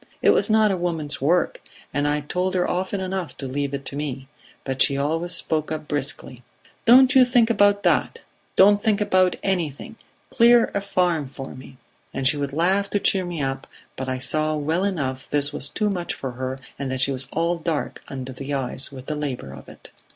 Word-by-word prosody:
It - - +6
was - - +2
not 215 -1 +4
a 190 - 0
woman's 165 -6 -2
work, 170 +6 +1 0.3
and 145 +2 0
I 150 0 0
told 180 +5 -2
her 180 -1 +1
often 190 +2 -2
enough 185 -2 -4
to 135 - -6
leave 140 +1 -2
it 140 -1 -7
to - - -6
me, 135 -2 -4 0.4
but 135 0 -3
she 140 - +4
always 165 +5 -1
spoke 155 -2 -1
up 155 -1 -4
briskly: 140 -3 -3 0.4
'Don't 255 +3 +7
you 260 -2 +7
think 245 -2 +3
about 205 -2 +3
that - - +1 0.4
don't 205 +2 +6
think 215 -2 +2
about 185 -3 +2
anything 180 +2 -2 0.3
clear 235 0 +5
a 200 - -1
farm 175 -7 0
for 135 0 -8
me.' 130 0 -13 0.4
And 135 - +1
she 145 - +4
would 140 -1 -3
laugh 190 +6 +1
to 205 - 0
cheer 190 -2 +1
me 170 -4 -4
up, 135 0 -3 0.3
but 130 0 -5
I 130 - -1
saw 155 +4 +1
well 155 +5 -1
enough 140 -9 -2
this 145 0 +2
was 140 - 0
too 210 +4 -1
much 175 -3 -3
for 135 - -5
her, 130 +1 -4 0.2
and 140 -1 -3
that 130 0 -2
she 140 - +2
was 130 -1 -2
all 170 +1 0
dark 160 -3 -3
under 130 -1 -6
the 140 +2 -4
eyes 135 0 -1
with 130 -1 -10
the 155 - -3
labour 135 - -4
of 70 - -12
it. - - -15
155 Hz, 210 wpm, -23 LUFS, 135-185 Hz, 0.4 s, Don't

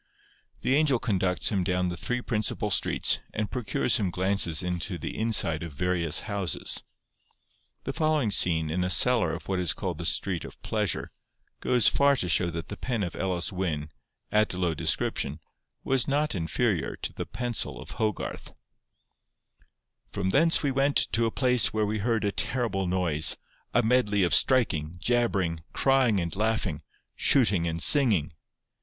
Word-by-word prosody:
The 130 - +1
angel 145 -3 +3
conducts 95 -6 0
him 95 -3 0
down 90 0 0
the 85 - -4
three 125 +7 -3
principal 110 -3 -2
streets, - - +1 0.2
and 105 -1 -2
procures 120 -2 0
him 100 -4 -1
glances 95 -2 0
into 90 +1 -3
the 75 - -6
inside 110 -8 +1
of 85 -3 -7
various 85 0 0
houses. 100 -4 -4 1.0
The - - -4
following 155 -8 +1
scene 80 -5 +1
in 90 +2 -1
a 90 - -1
cellar 115 -4 +3
of 80 - -7
what 95 -1 -1
is 85 -7 +1
called - - -5
the - - +1
street 90 -4 +1
of - - -11
Pleasure, - - -2 0.5
goes 125 -3 +3
far 140 0 +4
to 95 - -2
show 85 +1 +2
that 85 -1 -6
the 105 - -6
pen 120 -5 -2
of 90 - -5
Elis 90 -2 -2
Wyn, 80 -5 -3 0.4
at 105 -3 +1
low 90 -2 0
description, - - -1 0.4
was 130 -2 0
not 150 +2 0
inferior 90 - -1
to - - -5
the - - -6
pencil 120 -2 -3
of - - -10
Hogarth:— 110 -3 -4 1.6
'From 95 -1 -2
thence 165 +7 +3
we 140 - +1
went 140 +2 +1
to 115 0 +2
a - - 0
place 125 -2 +1
where 110 -1 +1
we 105 +1 -2
heard 115 +1 0
a 100 - +1
terrible 110 -5 -1
noise, 90 -4 +2 0.3
a 120 - +2
medley 110 -4 +2
of 85 - +1
striking, 90 - +3
jabbering, 95 -6 0
crying 130 -6 +2
and 85 -3 -3
laughing, 105 -7 -1 0.3
shooting 100 -10 +2
and 80 0 -3
singing. 110 - +6
100 Hz, 160 wpm, -27 LUFS, 85-120 Hz, 1.6 s, singing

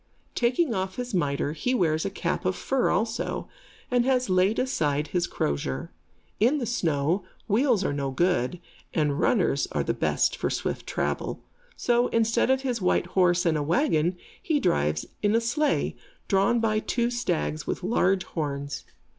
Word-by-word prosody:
Taking 245 +3 +1
off 190 -1 -2
his 245 -1 -5
mitre, 145 -4 0
he 250 +11 -1
wears 160 -6 +1
a - - 0
cap 185 -2 -2
of 185 0 0
fur 270 +5 0
also, 220 +5 -1 0.4
and 245 -1 +3
has 255 -4 +1
laid 185 +4 +3
aside 150 - 0
his 175 -1 0
crozier. 70 -2 -2 0.5
In 245 +8 +4
the 260 - -2
snow, 170 -5 0 0.2
wheels 225 -2 +2
are - - 0
no 140 -1 -2
good, 170 +1 0 0.4
and 150 -3 +1
runners - - +2
are - - +1
the - - 0
best - - +1
for - - -1
swift - - -3
travel. - - -2 0.3
So, 240 0 +2
instead 230 +1 +2
of 265 0 +3
his 245 -4 -1
white 180 -1 +2
horse 180 -1 +3
and 165 -2 +3
a 150 - 0
wagon, 170 - +1 0.2
he 310 -3 +1
drives 75 - +1 0.2
in 210 +1 +2
a - - +5
sleigh, 280 +5 0 0.3
drawn 200 +4 +3
by 215 -1 +1
two 235 +2 -1
stags 170 -9 -2
with - - -3
large 190 -2 +2
horns. 140 -3 -4
190 Hz, 165 wpm, -26 LUFS, 155-240 Hz, 0.5 s, a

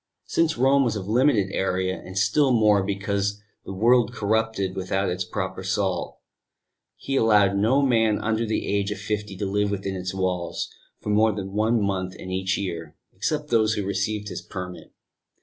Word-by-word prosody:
Since 165 -4 +1
Rome 135 +2 +4
was 115 -4 0
of 100 -2 -5
limited 115 -3 +3
area, 95 -1 -1
and, 95 +1 -8
still 120 +8 +3
more 105 -4 +4
because 100 +1 -1 0.3
the - - -6
world 120 +4 +3
corrupted 110 -3 0
without 95 +1 -1
its 90 +1 -2
proper 95 0 -4
salt, 95 -1 -1 0.8
he 135 - -4
allowed 105 -5 +4
no 115 +8 +3
man 115 -5 +3
under 110 +1 0
the 110 - -1
age 100 0 0
of 105 - -3
fifty 105 -1 -4
to 100 - -2
live 100 +1 0
within 100 -1 -3
its 90 0 -3
walls 90 -2 -2 0.3
for - - -5
more 110 +1 +4
than 95 -1 -6
one 110 +3 +2
month 95 -2 -2
in 95 - -8
each 95 0 0
year, 85 -4 -5 0.2
except 150 +10 -2
those 110 -2 +3
who 100 - -2
received 105 +2 -2
his - - -5
permit. 90 -2 -8
100 Hz, 175 wpm, -24 LUFS, 95-110 Hz, 0.8 s, Rome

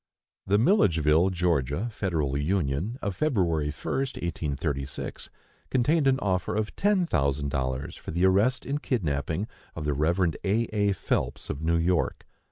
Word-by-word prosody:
The 100 +1 +4
Milledgeville 85 - +4
(Ga.) 85 - 0
Federal 80 - -1
Union 80 - -1
of 100 -2 -2
February 90 - +1
1st, 135 - -3
1836, 70 -4 -3 0.4
contained 140 +4 +2
an 130 -1 +4
offer 95 -1 0
of 105 0 -2
ten 200 -2 +2
thousand 70 - 0
dollars 65 0 -2
for - - -9
the 85 +3 +1
arrest 100 +7 +3
and 145 +2 -2
kidnapping 80 - -1 0.3
of 80 - -5
the 75 - +1
Rev. 85 +4 +1
A. 100 +2 +2 0.2
A. 100 -1 +3
Phelps, - - -2
of 70 - -5
New 85 +1 +2
York. 85 +1 0
90 Hz, 145 wpm, -27 LUFS, 75-105 Hz, 0.4 s, The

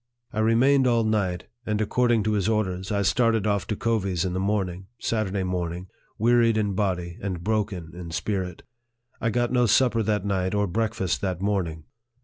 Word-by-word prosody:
I 110 - -2
remained 125 +5 +4
all 115 -2 +3
night, 100 -5 0 0.2
and, 105 -2 -1
according 120 +1 +2
to 110 - 0
his 105 0 +1
orders, 95 -3 -1
I 100 -1 +1
started 115 +2 +2
off 100 -2 0
to 110 - -1
Covey's 100 -6 0
in 90 - -2
the 95 - -1
morning, 95 -2 -1
(Saturday 100 -4 -1
morn 90 -2 -2
ing,) 90 +2 -8 0.3
wearied 115 0 +4
in 105 -2 0
body 90 -3 -2
and 95 -3 -4
broken 100 -5 -1
in 85 -1 -8
spirit. 90 0 -3 0.6
I 115 - +1
got 120 +1 0
no 125 -1 +4
supper 115 +2 +3
that 105 -2 0
night, 95 -1 0
or 105 0 +2
breakfast 110 -1 -1
that 95 -3 -2
morning. 90 -6 -1
100 Hz, 180 wpm, -25 LUFS, 95-110 Hz, 0.6 s, remained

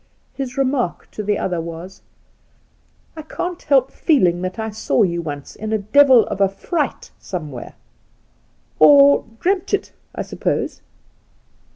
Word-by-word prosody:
His 265 -1 -6
remark 260 -7 -1
to - - -5
the 205 0 0
other 175 -3 -2
was: 170 +3 -9 1.1
*I 315 - -7
can't 350 +3 -5
help 270 -3 +2
feeling 180 - +2
tha%I 205 +5 -4
saw 220 +1 +1
you 170 -3 0
once 145 -3 -7
in 215 0 -5
a 220 - +2
deyU 245 +4 +5
of 200 - -4
a 195 - +4
fright 280 - -3
somewhere— 155 -9 -7 1.0
or 140 -2 +7
dreamt 385 +2 +1
it, - - -7 0.2
I - - -3
suppose - - -3
210 Hz, 135 wpm, -20 LUFS, 170-275 Hz, 1.1 s, or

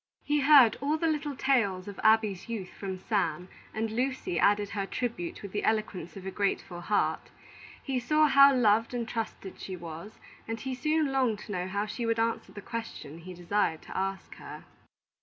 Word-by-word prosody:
He 295 0 +1
heard 275 -5 +7
all 295 +3 +1
the 330 - -1
little 300 -3 -1
tales 215 -9 +1
of 200 - -8
Abby's 220 -3 +3
youth 205 -6 -4
from 190 -2 -5
Sam, 185 -4 -1 0.2
and 220 0 -2
Lucy 260 +9 -1
added 205 0 +3
her 200 -1 -3
tribute 225 -9 -4
with 200 - -7
the 205 - -2
eloquence 210 -5 -1
of 190 - -9
a 190 - -3
grateful 190 -3 -2
heart; 205 +4 0 0.5
he 265 -2 -1
saw 305 +5 +3
how 275 -1 +7
loved 230 -2 +3
and 235 -2 -2
trusted 225 -4 -5
she 190 - -6
was, 170 +4 -9 0.3
and 225 0 -3
he 260 +4 -4
soon 305 +2 +1
longed 255 -5 +1
to - - -9
know 180 -2 -2
how 200 +2 -1
she 230 +2 -4
would 230 0 +1
answer 225 0 -1
the 205 - -9
question 195 -9 -7
he 180 +2 -9
desired 175 -2 0
to - - -10
ask 195 0 -3
her. - - -9
215 Hz, 190 wpm, -29 LUFS, 190-255 Hz, 0.5 s, heard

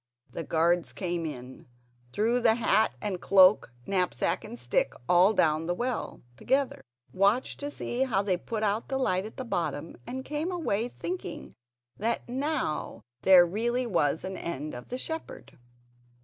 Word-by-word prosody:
The 165 - -5
guards 170 +2 +1
came 175 -3 -2
in, 125 -3 -9 0.4
threw 225 - +1
the 230 -2 +4
hat 220 - +2
and 185 -4 -2
cloak, 190 - +5
knapsack 185 -2 0
and 120 - -8
stick 120 0 0
all 180 +3 +6
down 160 -5 +2
the 175 - 0
well 245 +3 -3
together, 270 - 0 0.3
watched 200 +7 +2
to 285 - -4
see 255 -3 -4
how 205 -6 +1
they 195 -2 +1
put 215 +5 -4
out 210 +2 0
the 265 - 0
light 190 -7 0
at 220 - -14
the 260 - -4
bottom 170 -7 -3
and 260 +1 -5
came 300 +5 -2
away, 245 - -1
thinking 360 +8 -6 0.4
that 230 +2 -1
now 270 - -2 0.2
there 185 -2 +8
really 240 +7 -1
was 160 -8 +1
an 190 0 -5
end 155 -3 -5
of 125 - -8
the 250 - -4
shepherd. 320 - -7
200 Hz, 160 wpm, -28 LUFS, 175-245 Hz, 0.4 s, there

